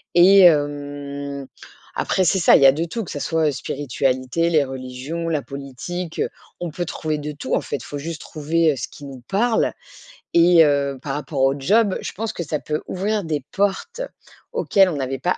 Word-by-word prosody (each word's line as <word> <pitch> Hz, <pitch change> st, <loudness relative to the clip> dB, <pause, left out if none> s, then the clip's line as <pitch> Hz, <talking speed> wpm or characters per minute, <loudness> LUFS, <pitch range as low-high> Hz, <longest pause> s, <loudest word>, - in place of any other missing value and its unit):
et 190 Hz, +2 st, +8 dB
hem, 145 Hz, -2 st, +1 dB, 0.5 s
après, 190 Hz, -, 0 dB
c'est 190 Hz, +2 st, +2 dB
ça. 170 Hz, -, +6 dB
Il -, -, +5 dB
y -, -, +7 dB
a 135 Hz, -, +9 dB
de 160 Hz, +4 st, -2 dB
tout, 215 Hz, +7 st, -4 dB
que -, -, -8 dB
ça 145 Hz, -, -4 dB
soit, 160 Hz, +1 st, +1 dB
heu, -, -, 0 dB
spiritualité, 135 Hz, +3 st, -1 dB
les 155 Hz, -3 st, +4 dB
religions, 130 Hz, +5 st, -5 dB
la 155 Hz, -3 st, 0 dB
politique. 140 Hz, +6 st, -6 dB, 0.4 s
On 175 Hz, -, -2 dB
peut 175 Hz, +3 st, -3 dB
trouver 155 Hz, -2 st, -3 dB
de 150 Hz, 0 st, -5 dB
tout, 145 Hz, -, -5 dB
en -, -, +3 dB
fait. 135 Hz, -5 st, -5 dB
Faut 145 Hz, -, -6 dB
juste 160 Hz, +2 st, -6 dB
trouver, 160 Hz, +1 st, +1 dB
heu, -, -, -2 dB
ce -, -, -4 dB
qui 145 Hz, -, -14 dB
nous 135 Hz, -2 st, -8 dB
parle, 225 Hz, +4 st, +1 dB, 0.6 s
et 170 Hz, -1 st, +7 dB
heu, 140 Hz, -2 st, +1 dB
par 140 Hz, -, -4 dB
rapport 145 Hz, -1 st, -3 dB
au 135 Hz, +1 st, +3 dB
job, 200 Hz, +8 st, +2 dB
je -, -, -5 dB
pense 225 Hz, +2 st, -4 dB
que 170 Hz, -, -4 dB
ça 150 Hz, -1 st, -2 dB
peut 150 Hz, 0 st, -3 dB
ouvrir 205 Hz, +2 st, -1 dB
des 155 Hz, -3 st, -2 dB
portes, 200 Hz, -, -1 dB, 0.5 s
auxquelles 195 Hz, -, +3 dB
on 155 Hz, -, -3 dB
n'avait 135 Hz, -1 st, -3 dB
pas 180 Hz, -, 0 dB
150 Hz, 205 wpm, -22 LUFS, 140-175 Hz, 0.6 s, a